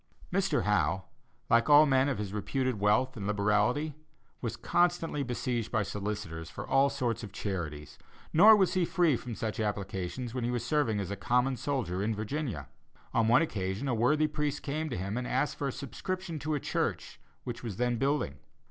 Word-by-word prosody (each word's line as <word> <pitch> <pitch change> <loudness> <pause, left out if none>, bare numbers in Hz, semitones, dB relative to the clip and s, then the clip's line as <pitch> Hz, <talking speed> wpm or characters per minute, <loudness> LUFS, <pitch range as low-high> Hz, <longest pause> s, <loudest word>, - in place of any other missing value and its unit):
Mr. 195 -6 +1
Howe, 95 -3 +1 0.4
like 115 +3 +3
all 150 +1 +9
men 135 -1 +3
of 135 - -1
his 105 -1 -4
reputed 130 +3 -1
wealth 110 +6 +2
and 100 -3 -4
liberality, 105 +9 +1 0.5
was - - -3
constantly 175 -4 +1
besieged 120 -3 -2
by 110 -3 +1
solicitors 95 -5 -4
for - - -7
all 135 +1 +4
sorts 120 -4 -2
of 105 -4 -8
charities, 75 -8 -5 0.3
nor 210 +7 +9
was 195 -3 +2
he 185 - +2
free 170 -4 +3
from 120 -1 -6
such 110 +2 -3
applications 105 +2 -3
when 125 -2 -2
he 120 - 0
was 120 -1 -2
serving 130 -8 +1
as 100 -1 -4
a - - -2
common 125 +6 +1
soldier 120 -8 -2
in 110 +2 0
Virginia. 110 - -3 0.5
On 115 -1 +3
one 120 +8 +5
occasion 100 - -3
a 130 - +1
worthy 145 +7 +3
priest 150 -1 -2
came 155 +2 -2
to 125 - -3
him 100 +5 -3
and 125 0 -3
asked 135 +3 0
for 140 - -2
a - - -1
subscription 175 +6 -5
to 150 +3 -1
a - - -1
church - - -2 0.2
which 120 -2 -5
was 110 -6 -5
then 125 -1 +1
building. 135 - 0
120 Hz, 190 wpm, -30 LUFS, 105-145 Hz, 0.5 s, all